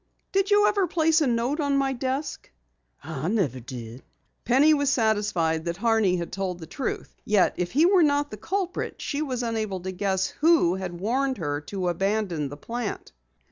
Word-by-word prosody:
"Did 390 +1 +1
you 415 0 +5
ever 400 -3 +2
place 325 -1 +2
a 295 - +3
note 245 +5 0
on 285 -2 +1
my 270 -1 +1
desk?" 265 +3 -3 0.5
"I 155 -1 -4
never 180 - 0
did." 120 0 -8 0.4
Penny 275 +6 +5
was 285 -2 +2
satisfied 205 - +1
that 170 0 -2
Horney 220 -3 +2
had 170 -1 -4
told 190 -2 -3
the 165 - -9
truth. 235 - -5
Yet 210 -3 +3
if 175 -1 -2
he 300 +5 +5
were 370 0 +5
not 290 -1 +2
the 215 - -6
culprit 370 - -3
she 290 0 -3
was 255 -5 -2
unable 215 -5 -2
to 190 +1 -4
guess 190 0 0
who 315 - +3
had 185 -2 -5
warned 260 +6 0
her 145 -5 -2
to 190 -3 -3
abandon 180 -4 -1
the 145 - -8
plant. 230 +6 -5
220 Hz, 180 wpm, -25 LUFS, 180-285 Hz, 0.5 s, you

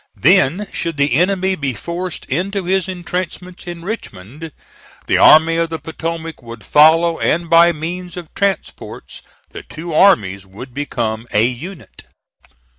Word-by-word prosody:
Then, 180 - +3
should 165 -3 -4
the 140 -1 +2
enemy 190 +5 +2
be 140 -8 -3
forced 170 - -5
into 190 +6 -2
his 190 +1 0
intrenchments 180 0 -5
in 170 -1 -7
Richmond, 155 - -7 0.5
the - - +1
Army 160 +1 +6
of 165 0 0
the 165 - -4
Potomac 165 0 -6
would 115 -2 -11
follow, 165 +5 +4
and 170 0 0
by 170 +1 +7
means 175 +3 -6
of 170 -3 -9
transports 200 -3 -4 0.3
the - - -8
two 165 +1 -8
armies 105 - +3
would 105 +7 -11
become 120 -5 -3
a 105 +2 +3
unit. 130 - -7
165 Hz, 140 wpm, -17 LUFS, 135-180 Hz, 0.5 s, by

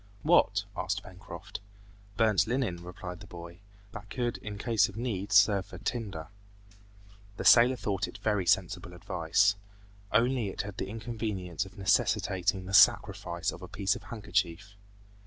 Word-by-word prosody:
"What?" - - +3
asked - - -2
Pencroft. 90 0 -9 0.6
"Burnt 110 -2 +3
linen," 115 -8 -1
replied 90 0 -8
the 105 - -12
boy. 85 0 -10 0.3
"That 105 -2 -10
could 120 -2 -2
in 105 -1 -7
case 110 -2 +2
of 100 - -11
need 105 -4 -3
serve 100 -2 +5
for 95 - -10
tinder." 100 -5 -4 1.1
The - - -5
sailor 120 +2 +7
thought 100 -5 -2
it - - -10
very 105 -4 -1
sensible 90 - +1
advice. 90 +4 +1 0.5
Only 120 -1 +2
it 95 - -4
had 100 -1 -8
the 95 - -4
inconvenience 105 -5 -4
of 95 - -17
necessitating 95 0 +1
the 100 - -7
sacrifice 85 -3 +4
of 85 - -11
a 90 - -8
piece 100 +2 0
of - - -8
handkerchief. 100 -3 -2
100 Hz, 150 wpm, -29 LUFS, 90-110 Hz, 1.1 s, sailor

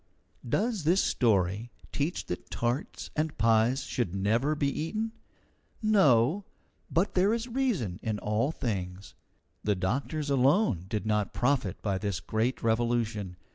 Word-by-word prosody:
Does 215 - 0
this 175 +5 +4
story 105 -1 +1 0.2
teach 150 +5 -2
that 90 - -6
tarts 120 +4 -3
and 155 0 -1
pies 115 +4 +3
should 100 -7 -2
never 115 +10 +1
be 145 - 0
eaten? 215 +11 -2 0.7
No; 190 - +4 0.5
but 175 +5 +1
there 195 +5 +3
is 235 +1 -4
reason 230 - -1
in 110 -2 -2
all 105 +7 0
things. 100 - -4 0.5
The 105 -1 +2
doctors 140 - -2
alone 135 - +3
did 105 0 -3
not 105 -1 0
profit 125 -7 0
by 100 -3 0
this 100 -2 -2
great 110 +7 -1
revolution. 115 -4 0
120 Hz, 135 wpm, -29 LUFS, 105-155 Hz, 0.7 s, this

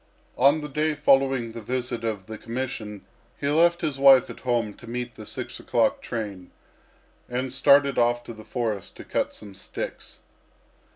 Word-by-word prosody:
On 145 +3 +4
the 150 - -5
day 150 +2 0
following 135 -4 +3
the 115 0 -8
visit 125 +1 -3
of 105 -4 -3
the 110 -1 -8
commission 115 -4 -5 0.3
he 140 - -2
left 170 +3 +4
his 150 -4 -2
wife 135 -2 +7
at - - -11
home 120 -4 0
to 120 - -13
meet 120 0 -4
the 110 - -11
six - - -6
o'clock - - +1
train, 100 -6 -5 0.8
and 125 +1 -2
started 140 0 +5
off 120 0 +2
to 120 - -8
the 110 -1 -12
forest 110 -3 -3
to - - -10
cut - - -2
some 100 -2 -10
sticks. 95 - -7
120 Hz, 170 wpm, -25 LUFS, 110-135 Hz, 0.8 s, wife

